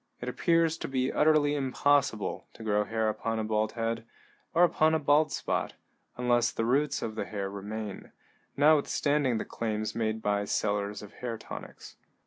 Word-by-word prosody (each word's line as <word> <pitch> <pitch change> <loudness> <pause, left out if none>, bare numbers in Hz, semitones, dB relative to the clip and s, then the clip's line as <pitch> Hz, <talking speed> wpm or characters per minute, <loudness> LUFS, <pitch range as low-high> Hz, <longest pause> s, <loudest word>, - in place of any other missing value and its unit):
It 120 - -6
appears 165 +4 +2
to - - -4
be 130 -1 -1
utterly 150 -1 +4
impossible 140 -4 +1
to 115 - -11
grow 105 -1 +1
hair 110 +1 -1
upon 110 +1 -2
a 110 - -1
bald 110 0 0
head, 115 -1 -2 0.5
or 170 - +4
upon 160 -2 +4
a - - +2
bald 150 +1 +3
spot, - - -2 0.4
unless 120 -1 +2
the 115 - -2
roots 140 +4 +1
of 110 - -3
the 110 - -3
hair 100 -2 -4
remain, 105 +1 -6 0.5
notwithstanding 145 -3 +3
the - - -3
claims 110 -2 -3
made 110 -1 -1
by 100 0 +1
sellers 105 0 -1
of 105 +1 -12
hair 120 -2 -5
tonics. - - -10
115 Hz, 165 wpm, -29 LUFS, 110-145 Hz, 0.5 s, utterly